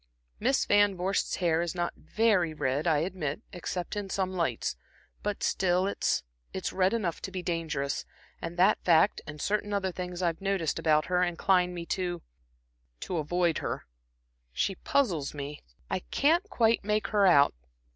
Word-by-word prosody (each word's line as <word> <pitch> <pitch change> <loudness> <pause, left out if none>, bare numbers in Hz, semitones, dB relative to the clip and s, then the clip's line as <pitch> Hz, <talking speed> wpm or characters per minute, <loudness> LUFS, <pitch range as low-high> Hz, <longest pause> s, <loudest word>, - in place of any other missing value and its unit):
Miss 265 +4 +2
Van 205 -2 +4
Vorst's 190 +3 0
hair 170 -2 +1
is 170 +1 -3
not 175 -1 -1
very 205 -8 +1
red, 145 +2 0
I 160 -3 +4
admit, 180 0 -4
except 180 +1 -4
in 205 -2 -4
some 190 -1 -1
lights, 165 - -1 0.5
but 205 -1 -3
still 185 0 +2
it's 200 - 0 0.3
it's 190 - -3
red 185 0 +3
enough 185 -8 -2
to - - -4
be 185 -1 -4
dangerous; 155 -5 -2 0.4
and 170 - -5
that 190 +4 +4
fact, 170 +3 +4
and 150 0 -8
certain 205 +4 -1
other 195 -2 0
little 180 - -11
things 180 0 -5
I've 170 +1 0
noticed 195 -5 0
about 155 -1 +3
her, 180 0 +1
incline 180 +1 +2
me 170 -1 -5
to 175 -2 -2 0.8
to 180 - -3
avoid 170 +2 +1
her. - - -3 0.7
She 195 - 0
puzzles 180 - 0
me; 145 +1 -6 0.3
I - - -1
can't 330 - +1
quite 230 - +2
make 210 +1 0
her 205 -2 +4
out. 145 -6 +6
180 Hz, 165 wpm, -29 LUFS, 165-195 Hz, 0.8 s, out